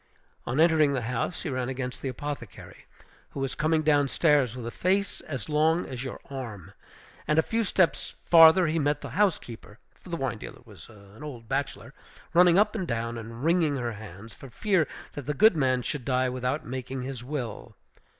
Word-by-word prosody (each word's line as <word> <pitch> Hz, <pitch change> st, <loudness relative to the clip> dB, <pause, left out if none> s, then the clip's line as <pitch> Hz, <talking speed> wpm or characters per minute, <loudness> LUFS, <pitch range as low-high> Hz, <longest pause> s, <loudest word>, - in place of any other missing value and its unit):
On 125 Hz, +5 st, -1 dB
entering 160 Hz, -3 st, +4 dB
the 125 Hz, -3 st, -1 dB
house, 125 Hz, +8 st, -3 dB
he 165 Hz, -, -3 dB
ran 130 Hz, -1 st, -2 dB
against 130 Hz, -1 st, -5 dB
the 135 Hz, -, -3 dB
apothecary, 130 Hz, -, -8 dB, 0.4 s
who -, -, -8 dB
was 135 Hz, -1 st, -2 dB
coming 155 Hz, 0 st, +1 dB
down 145 Hz, -2 st, +3 dB
stairs, 140 Hz, -5 st, +2 dB
with 120 Hz, -, -6 dB
a 120 Hz, -, -4 dB
face 195 Hz, +6 st, 0 dB
as 130 Hz, -4 st, -4 dB
long 160 Hz, +3 st, +2 dB
as 125 Hz, -1 st, -6 dB
your 130 Hz, -, -6 dB
arm; 115 Hz, -, -7 dB, 0.5 s
and 150 Hz, -, +2 dB
a 160 Hz, -, +5 dB
few 230 Hz, +5 st, 0 dB
steps 185 Hz, -3 st, +1 dB
farther 165 Hz, +2 st, +8 dB
he 160 Hz, +1 st, 0 dB
met 145 Hz, 0 st, 0 dB
the -, -, -7 dB
housekeeper 120 Hz, -, -1 dB, 0.2 s
for -, -, -17 dB
the 170 Hz, -, -2 dB
wine 135 Hz, -6 st, -3 dB
dealer -, -, -10 dB
was 105 Hz, -2 st, -13 dB
an 105 Hz, +2 st, -15 dB
old 125 Hz, -7 st, -8 dB
bachelor 135 Hz, -2 st, -3 dB, 0.4 s
running 175 Hz, 0 st, +6 dB
up 210 Hz, +1 st, +4 dB
and 190 Hz, -6 st, -3 dB
down, 115 Hz, -1 st, -2 dB
and 115 Hz, +2 st, -8 dB
wringing 165 Hz, -3 st, +2 dB
her 120 Hz, -3 st, -2 dB
hands, 105 Hz, 0 st, -10 dB
for 135 Hz, -, -12 dB
fear 185 Hz, -, +1 dB, 0.3 s
that 145 Hz, -3 st, -7 dB
the 150 Hz, -, -1 dB
good 215 Hz, +3 st, +6 dB
man 130 Hz, -4 st, +1 dB
should 145 Hz, 0 st, -4 dB
die 130 Hz, 0 st, +1 dB
without 125 Hz, +3 st, -2 dB
making 130 Hz, +1 st, -5 dB
his 130 Hz, -2 st, -6 dB
will. 120 Hz, -5 st, -5 dB
135 Hz, 195 wpm, -27 LUFS, 120-160 Hz, 0.5 s, farther